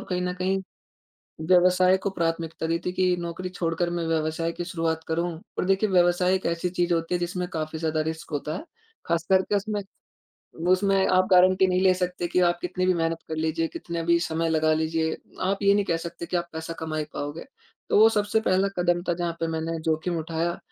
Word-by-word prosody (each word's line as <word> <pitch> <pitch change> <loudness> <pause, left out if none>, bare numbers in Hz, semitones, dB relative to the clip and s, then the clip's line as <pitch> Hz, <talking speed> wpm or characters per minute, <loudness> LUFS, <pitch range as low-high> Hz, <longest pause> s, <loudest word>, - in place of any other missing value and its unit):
कहीं 180 -1 -1
न 180 0 -2
कहीं 190 +1 +1 0.9
व्यवसाय 185 +1 +5
को - - +1
प्राथमिकता 165 -2 -2
दी 165 +1 +1
थी 180 - 0
कि 185 -1 +2
नौकरी 170 +2 -5
छोड़कर 175 -1 -1
मैं 170 -1 -2
व्यवसाय 160 +1 0
की 175 - -5
शुरुआत 165 -2 -2
करूँ। 170 +2 0 0.3
और - - 0
देखिए 195 +3 +2
व्यवसाय 180 0 +3
एक 190 - -4
ऐसी 170 +1 -1
चीज़ 175 -1 0
होती 165 +1 -1
है - - -1
जिसमें 180 +1 -2
काफ़ी 155 0 -3
ज़्यादा 160 -1 0
रिस्क 160 +1 -5
होता 150 +1 -3
है। - - -6 0.4
खास 170 0 0
करके 190 +2 +3
उसमें, 205 +1 -1 0.9
उसमें 195 +1 +3
आप 185 0 +3
गारंटी 185 +1 +6
नहीं 185 0 +1
ले 190 -1 +5
सकते 180 -1 -2
कि 180 - +1
आप 175 -1 +2
कितनी 180 +1 -2
भी 185 - +4
मेहनत 165 -1 0
कर 160 - -2
लीजिए, 160 +1 0
कितने 170 0 -5
भी 170 +1 +3
समय 165 -1 -1
लगा 155 0 +2
लीजिए, 160 0 0 0.2
आप 195 +2 0
ये 200 0 +6
नहीं 205 0 +2
कह 165 - 0
सकते 170 +1 -6
कि 175 - -1
आप 170 0 -3
पैसा 160 +1 -5
कमा 160 -1 -3
ही 155 - -1
पाओगे। 145 +3 -5 0.4
तो - - +4
वो 220 - +8
सबसे 210 0 +1
पहला 190 -1 +2
कदम 175 0 +2
था - - +3
जहाँ 170 0 -2
पे 165 - -1
मैंने 165 0 -3
जोखिम 160 +2 0
उठाया। 165 +2 -2
175 Hz, 210 wpm, -25 LUFS, 165-185 Hz, 0.9 s, वो